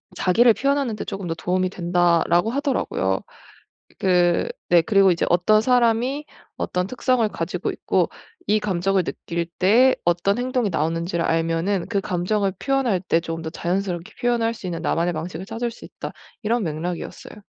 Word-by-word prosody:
"자기를 230 +6 +4
표현하는데 275 -5 0
쪼금 195 -2 -5
더 165 - -1
도움이 185 +3 0
된다."라고 175 +2 +2
하더라고요. 255 - 0 0.8
그 180 - +3 0.2
네 175 -1 +6
그리고 195 +1 +4
이제 170 - +1
"어떤 215 +5 +4
사람이 250 +4 +2 0.3
어떤 180 0 -1
특성을 255 +1 +1
가지고 - - -3
있고 - - 0 0.4
이 215 0 +2
감정을 195 -2 0
느낄 170 +1 -4
때 240 +8 +5
어떤 175 +3 +2
행동이 250 -3 0
나오는지를 165 +1 -1
알면은 165 +3 0
그 200 -3 0
감정을 195 +2 0
표현할 270 -8 +1
때 170 -2 +1
쪼금 165 -1 -5
더 160 - -4
자연스럽게 175 0 -3
표현할 235 -2 +1
수 210 - -9
있는 170 -2 -4
나만의 170 +1 0
방식을 170 +3 -5
찾을 235 +2 -3
수 230 - -12
있다." - - -8 0.3
이런 230 +1 +1
맥락이었어요. 170 +5 -5
185 Hz, 365 characters per minute, -23 LUFS, 170-230 Hz, 0.8 s, 네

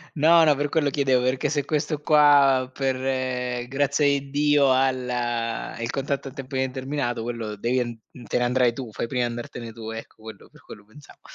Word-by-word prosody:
No, 165 +3 +5
no, 150 -3 +4
per 145 +1 -1
quello 145 -2 +1
chiedevo, 135 -3 +2
perché 130 +1 0
se 145 -3 -1
questo 150 0 -2
qua 145 -4 +5
per, 135 -1 -1
ehm, 125 -2 -2
grazia 140 +2 +1
di 140 -1 +1
Dio 145 -1 +3
ha 135 +1 +3
l 130 -1 -5 0.7
il 115 +2 -2
contatto 135 0 -3
a - - -9
tempo 135 -1 -7
indeterminato, 130 -2 -2
quello 115 -3 -4
devi 120 +5 0
en 120 -2 -3 0.3
te - - 0
ne 125 - +1
andrai 125 -1 +2
tu, 120 -2 -7
fai 115 - -3
prima 125 0 -1
a - - +1
andartene 120 -1 -7
tu, 110 -1 -8
ecco, 110 -1 -9
quello 110 -3 -11
per - - -20
quello 105 - -13
pensavo. 125 +7 -17
130 Hz, 200 wpm, -24 LUFS, 120-145 Hz, 0.7 s, No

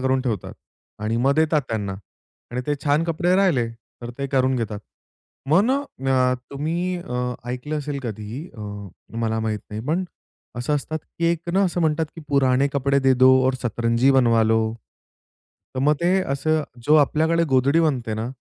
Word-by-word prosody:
करून 130 0 +1
ठेवतात 115 -8 -3 0.5
आणि 110 +2 0
मग 140 +1 +4
देतात 155 -1 +2
त्यांना. 100 -3 -2 0.6
आणि 125 +1 -2
ते 150 - +1
छान 145 +3 +2
कपडे 170 +2 +1
राहिले, 160 -12 +2 0.3
तर 120 - -5
ते 140 - -2
करून 130 -1 +2
घेतात. 105 -3 -3 0.7
मग 175 +6 +6
ना 260 +4 +2 0.5
अ, 125 - +2 0.2
तुम्ही 170 +6 -2
अ, 125 -6 -3 0.2
ऐकलं 145 +5 -3
असेल 145 -1 -4
कधीही, 115 - -6
अ, - - -9 0.6
मला 110 -1 0
माहीत 110 -1 -2
नाही 105 +1 -4
पण 170 +5 0 0.5
असं 125 +5 -1
असतात, 155 +2 -2 0.2
की 170 - 0
एक 170 0 -1
ना 195 +2 +3
असं 180 -1 -1
म्हणतात, 160 -1 +1
की - - -7
पुराने 140 -1 +3
कपडे 140 0 +2
दे 135 0 +4
दो 130 +1 +6 0.2
और 130 - +2
सतरंजी 115 +2 +2
बनवालो. 115 -4 +4 1.1
तर 130 - -2
मग 150 +2 +4
ते 170 - +2 0.2
असं 155 +3 +1 0.2
जो 150 - +5
आपल्याकडे 160 +3 +3
गोधडी 135 +4 +3
बनते 130 -8 0
ना, 110 +2 -3
135 Hz, 170 wpm, -23 LUFS, 120-155 Hz, 1.1 s, मग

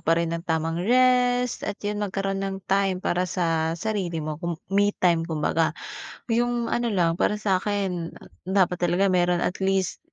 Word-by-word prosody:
pa 165 +1 +2
rin 170 0 0
ng 170 - -2
tamang 165 -1 -1
rest 250 +2 +3
at - - -3
'yun 205 0 -2
magkaroon 195 -1 -2
ng 195 -1 -4
time 195 -1 +1
para 180 +1 0
sa 165 -2 0
sarili 175 -5 -2
mo. 155 0 -5
Kum 170 -2 -3 0.2
me 205 +1 +4
time, 170 -2 +3
kumbaga. 160 +1 0 0.6
'Yung 240 0 0
ano 240 0 0
lang, 175 -5 +1
para 210 - +2
sa'kin, 190 -4 -1 0.3
dapat 185 -2 +2
talaga 180 +2 +2
meron 175 -1 +2
at 180 - -2
least, 190 -1 0
185 Hz, 165 wpm, -25 LUFS, 170-205 Hz, 0.6 s, me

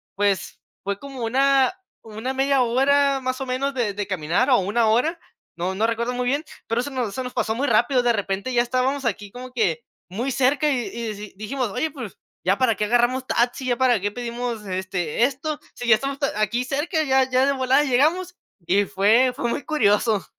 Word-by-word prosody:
pues, 200 -1 0 0.2
fue 200 0 -2
como 270 -4 -7
una 270 +4 +3 0.3
una 225 +4 -5
media 270 0 +2
hora 275 +3 +3
más 255 0 -2
o - - -2
menos 265 +2 -1
de 230 -6 0
de 205 -1 -4
caminar 190 - 0
o 250 - +6
1 220 +4 +1
hora, 280 +10 +2 0.4
no 180 +2 -2
no 215 +4 +1
recuerdo 235 +2 -1
muy 250 0 -2
bien, 285 +5 0 0.2
pero 230 +2 0
se 285 - -5
nos 245 -6 -2
se 260 - -3
nos 250 - -6
pasó 220 - 0
muy 280 +4 -1
rápido, 240 +3 +3
de 240 -1 +3
repente 200 +2 -2
ya 240 0 +4
estábamos 255 +2 -1
aquí 205 -2 -2
como 255 +1 -9
que 180 -10 0 0.3
muy 235 +9 -3
cerca, 270 +4 +2
y 270 - +1
y 230 -2 -5
si 205 0 -9
dijimos: 240 +3 -3
"Oye, 315 +10 -2
pues 245 -9 -8 0.3
ya 195 +2 +3
para 255 -4 +2
qué 210 +2 -1
agarramos 245 +3 +1
taxi, 245 +2 0
ya 245 - +2
para 250 -4 +3
qué 205 - -1
pedimos, 240 -1 -4
este, 185 0 -2
esto, 285 +3 -3 0.2
sí 245 - -6
ya 220 - +7
estamos 275 +4 -4
a 240 -6 -1
aquí 235 +4 0
cerca, 300 +5 -1
ya 265 -2 +2
ya 255 +1 +3
de 280 - +3
volada 260 +2 +3
llegamos", 320 +8 +1 0.3
y 200 +2 +3
fue 220 +8 +3
fue 240 - -2
muy 285 - -3
curioso. 215 -7 +2
245 Hz, 210 wpm, -23 LUFS, 210-270 Hz, 0.4 s, ya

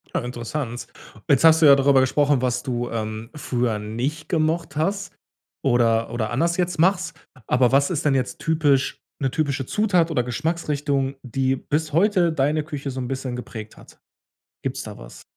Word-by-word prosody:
Äh, - - +3
interessant. 120 +1 -5 0.4
Jetzt 140 -1 +4
hast 160 0 +7
du - - +7
ja 140 -1 +9
darüber 135 -1 +4
gesprochen, 140 +1 +2
was 125 -1 0
du, 120 -3 -2
ähm, 110 0 -4
früher 125 -6 -1
nicht 125 +9 -4
gemocht 160 -2 0
hast 195 +6 -1 0.5
oder 115 -3 +2
oder 115 -2 -2
anders 170 +8 +1
jetzt 180 -2 -1
machst, 180 -1 +2 0.3
aber 125 -1 +3
was 140 +1 +3
ist 170 -4 -2
denn 145 -2 +3
jetzt 130 -1 -2
typisch 150 -5 +1 0.2
'ne 135 - 0
typische 140 -3 -1
Zutat 180 - +2
oder 125 -6 +1
Geschmacksrichtung, 145 0 -1
die 130 +1 0
bis 150 +3 -2
heute 180 0 +3
deine 150 +1 +1
Küche 145 -2 -5
so 130 - -5
'n 125 - -3
bisschen 130 -1 -4
geprägt 110 -3 -8
hat? - - -17 0.6
Gibt's - - -3
da - - -9
was? - - -12
140 Hz, 170 wpm, -23 LUFS, 125-160 Hz, 0.6 s, ja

